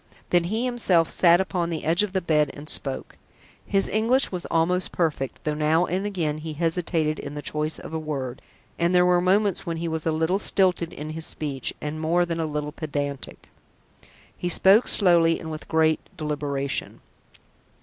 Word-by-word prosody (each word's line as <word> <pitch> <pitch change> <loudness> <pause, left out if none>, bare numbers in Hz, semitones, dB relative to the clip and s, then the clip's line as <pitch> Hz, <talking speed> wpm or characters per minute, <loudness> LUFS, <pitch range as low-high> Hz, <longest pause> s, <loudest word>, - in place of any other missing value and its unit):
Then 175 -1 +3
he 220 +7 -1
himself 195 -10 +2
sat 175 -1 +5
upon 180 -3 -1
the 165 -2 -4
edge 165 +4 +3
of 210 -2 -1
the 190 0 0
bed 150 -3 +2
and 145 +1 -10
spoke. 135 -3 -1 0.5
His 195 -1 +1
English 235 +5 +2
was 180 -2 -5
almost 180 +3 +1
perfect, 150 -6 -2
though 150 - -1
now 155 +3 +2
and 185 +4 -2
again 160 -7 -2
he 155 0 -6
hesitated 165 -1 0
in 145 0 -7
the 145 - -4
choice 150 +1 -2
of - - -9
a 160 - -1
word, 140 -5 -4 0.4
and 170 +2 +2
there 180 0 +5
were 180 0 +4
moments 195 +2 +2
when 165 -1 -2
he 170 +1 -3
was 160 0 -3
a - - +2
little 160 +5 +1
stilted 180 -4 +2
in 155 +1 -7
his 160 0 -4
speech, 140 -5 -3
and 155 +1 -5
more 170 +2 +2
than 170 -1 -3
a 160 - -1
little 150 0 -3
pedantic. 145 -4 -5 0.8
He 175 - -3
spoke 195 +6 +5
slowly 170 -4 +4
and 160 - -7
with 155 - -7
great 160 -1 +3 0.2
deliberation. 145 -3 -3
165 Hz, 185 wpm, -24 LUFS, 150-180 Hz, 0.8 s, sat